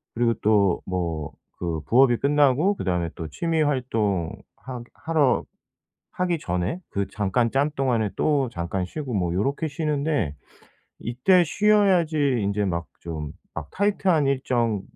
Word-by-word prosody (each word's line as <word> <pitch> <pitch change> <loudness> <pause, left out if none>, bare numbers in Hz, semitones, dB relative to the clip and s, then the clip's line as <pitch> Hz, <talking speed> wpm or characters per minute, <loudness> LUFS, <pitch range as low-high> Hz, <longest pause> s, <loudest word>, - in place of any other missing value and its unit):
그리고 120 0 +2
또 100 -4 +3
뭐 85 -5 -3 0.2
그 85 -3 -2
부업이 120 0 +5
끝나고 145 - +3
그다음에 90 -2 -1
또 80 - -5
취미 165 - -1
활동 110 - 0 0.3
하 125 -1 -7
하러 155 -5 +1 0.7
하기 180 -2 0
전에 90 - -2
그 100 0 -1
잠깐 105 +4 0
짬 140 +3 +1
동안에 120 -6 +1
또 140 -5 +2
잠깐 90 +1 -3
쉬고 135 - -5
뭐 90 -3 0
요렇게 140 - 0
쉬는데 145 - -1 0.6
이때 130 +10 +3
쉬어야지 170 - +3
인제 100 +1 0
막 85 -3 -2
좀 80 -3 -5 0.2
막 80 -2 -6
타이트한 195 -6 +2
일정 125 -6 0
125 Hz, 255 characters per minute, -24 LUFS, 95-150 Hz, 0.7 s, 부업이